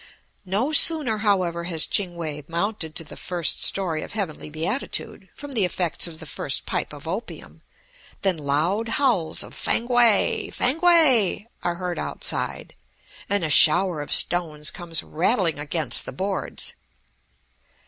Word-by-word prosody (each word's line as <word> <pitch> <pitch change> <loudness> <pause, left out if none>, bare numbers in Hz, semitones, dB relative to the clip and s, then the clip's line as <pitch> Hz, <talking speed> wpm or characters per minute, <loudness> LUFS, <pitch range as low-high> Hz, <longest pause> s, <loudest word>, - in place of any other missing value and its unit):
No 215 +10 -1
sooner, 305 -9 +6
however, 185 -5 0
has 165 -3 +2
Ching 180 -4 -2
We 155 -3 -6
mounted 170 -2 -3
to 165 - -1
the 150 - -11
first 175 -3 -2
story 170 -5 0
of - - -9
heavenly 190 -8 -5
beatitude 165 - -3
from 290 -1 -9
the 225 -7 +1
effects 180 -2 -1
of 160 -2 -10
the 160 - -9
first - - -2
pipe - - -3
of - - -11
opium, - - -7 0.6
than 190 -2 +1
loud 155 +10 -1
howls 230 - 0
of - - -13
"Fankwae. 240 -3 +2
Fankwae!" 285 - +3 0.2
are 175 -1 -2
heard 180 0 -5
outside, - - -3 0.6
and 200 -3 0
a 155 - -1
shower 160 +2 +6
of 145 - -8
stones 155 -4 +2
comes 170 -3 -3
rattling 170 -2 0
against 155 +2 -2
the - - -5
boards. 195 +1 -4
180 Hz, 140 wpm, -23 LUFS, 160-215 Hz, 0.6 s, sooner